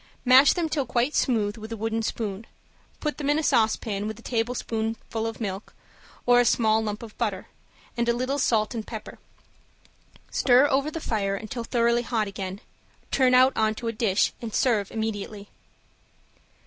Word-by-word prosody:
Mash 260 +3 +7
them 345 -3 -1
till 295 -4 -2
quite 250 +5 0
smooth 215 -6 +1
with 220 +1 -9
a 225 - -4
wooden 225 +1 -1
spoon, 220 -1 -4 0.5
put 300 -1 -3
them 285 -1 -1
in 295 - +3
a 315 - 0
saucepan 220 -4 +1
with 220 -1 -5
a 235 - -15
tablespoonful 225 -1 -2
of 225 - -6
milk 200 -2 -5 0.5
or 245 0 +6
a - - +5
small 220 -2 +3
lump 210 +1 -4
of 220 -2 -11
butter, 205 -5 -2 0.5
and 235 0 0
a - - +4
little 255 +4 -1
salt 220 -4 +1
and 225 -2 -5
pepper; 220 -3 -8 1.1
stir 255 +2 +5
over 280 +1 +1
the 330 - -5
fire 200 -8 -1
until 225 +4 -5
thoroughly 235 0 +2
hot 230 -3 -1
again, 195 0 -6 0.5
turn 255 -2 +4
out 255 +1 +6
on 215 0 +1
to 230 - -6
a - - +1
dish, 215 -4 +1
and 225 -3 -5
serve 215 -6 +2
immediately. 210 -2 -4
225 Hz, 175 wpm, -25 LUFS, 215-250 Hz, 1.1 s, Mash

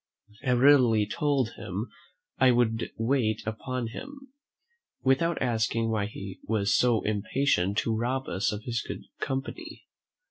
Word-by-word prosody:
I 125 -3 +2
readily 125 -4 +5
told 135 0 0
him 100 +6 -5 0.5
"I 130 - +6
would 120 -2 +2
wait 115 -2 +1
upon 115 +2 -3
him" 270 - -10 0.7
without 135 +6 +2
asking 115 -1 0
why 105 -2 0
he 100 -2 -8
was 105 -2 +1
so 120 -3 +3
impatient 105 -2 0
to 115 - 0
rob 125 +4 -1
us 95 +3 0
of 105 0 -5
his 120 -1 -2
good - - -7 0.2
company. 160 - -5
120 Hz, 135 wpm, -28 LUFS, 110-135 Hz, 0.7 s, I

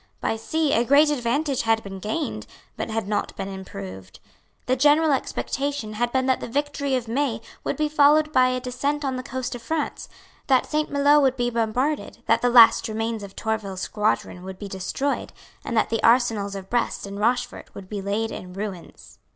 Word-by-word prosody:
By - - -1
sea 300 +6 0
a 230 - +3
great 285 +4 +5
advantage 275 +1 0
had 225 -1 +1
been 195 -1 -7
gained, 280 - -3 0.3
but - - -4
had 225 -2 -2
not 205 0 -2
been - - -4
improved. 95 - -9 0.5
The 255 - +2
general 295 +4 +4
expectation 275 -3 -2
had 240 +3 -1
been 260 0 +1
that 260 -1 +2
the - - -5
victory 280 +1 -1
of 245 -2 -2
May 240 -1 0 0.2
would - - -2
be 305 0 +1
followed 300 +1 +4
by 255 -2 +5
a 255 0 0
descent 280 +4 -2
on 265 -1 -1
the 255 - -3
coast 260 0 -4
of 245 - -7
France, 310 +6 -3 0.4
that 260 -2 +4
Saint 305 0 -1
Maloes 285 +1 +4
would 265 -2 +3
he 245 0 0
bombarded, 235 +3 -1
that 225 - +3
the 245 - +3
last 230 -1 +7
remains 225 0 -2
of 200 -1 -10
Tourville's 205 -4 -3
squadron 210 -3 -1
would 190 0 -7
be 205 - -7
destroyed, 195 +9 -3 0.3
and 235 - -3
that 220 - +2
the 225 - 0
arsenals 225 -4 +3
of 190 -1 -7
Brest 240 -1 -1
and 200 0 -7
Rochefort 245 +3 -1
would 195 - -9
be 205 0 -5
laid 210 +3 -1
in 180 0 -8
ruins. 195 -3 -8
240 Hz, 195 wpm, -24 LUFS, 210-280 Hz, 0.5 s, last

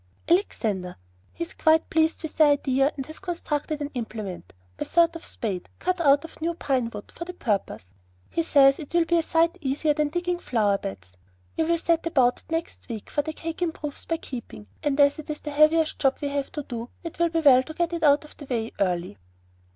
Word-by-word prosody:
"Alexander. 215 - 0 0.4
He - - -4
is 335 - -9
quite 320 0 +3
pleased 320 +1 +2
with 320 - -5
the 310 - +7
idea, 275 -1 +3
and 270 - -4
has 315 +2 -10
constructed 310 -4 -3
an 290 - -5
implement 220 -6 -6 0.3
a - - 0
sort 335 0 +3
of 330 - -8
spade, 195 -6 -4
cut 365 0 -1
out 285 0 +4
of 330 - -13
new 335 +1 -1
pine 260 -7 0
wood 210 -2 -9
for - - -7
the 360 +1 -8
purpose. 200 - -2 0.4
He 335 - +1
says 275 -4 +5
it 295 - -8
will 340 -1 +4
be 340 +1 +3
a - - +3
sight 330 +2 +1
easier 290 +2 +1
than 300 0 0
digging 350 +2 -1
flower 210 - +1
beds. 90 -2 -7 0.4
We 320 - +1
will 335 +1 +2
set 335 0 +1
about 260 -7 +3
it - - -23
next 325 -4 -4
week; 220 -3 -6
for 290 - +1
the 315 - -4
cake 330 +2 -6
improves 310 -4 -3
by 330 - -1
keeping, 240 - -8 0.2
and 290 -1 0
as 285 +1 +5
it 310 - -9
is 300 - -4
the 295 - -5
heaviest 310 +2 +3
job 270 -1 +2
we 285 - -2
have 280 -1 -2
to 295 - -4
do, 240 -2 -6
it 335 -1 -7
will 340 0 +3
be 330 0 0
well 265 -4 +7
to 315 +4 -9
get 345 0 0
it 335 - -2
out 290 -1 +4
of 300 - -15
the 290 - -9
way 230 -4 -2
early." 175 - -1
295 Hz, 225 wpm, -25 LUFS, 255-330 Hz, 0.4 s, the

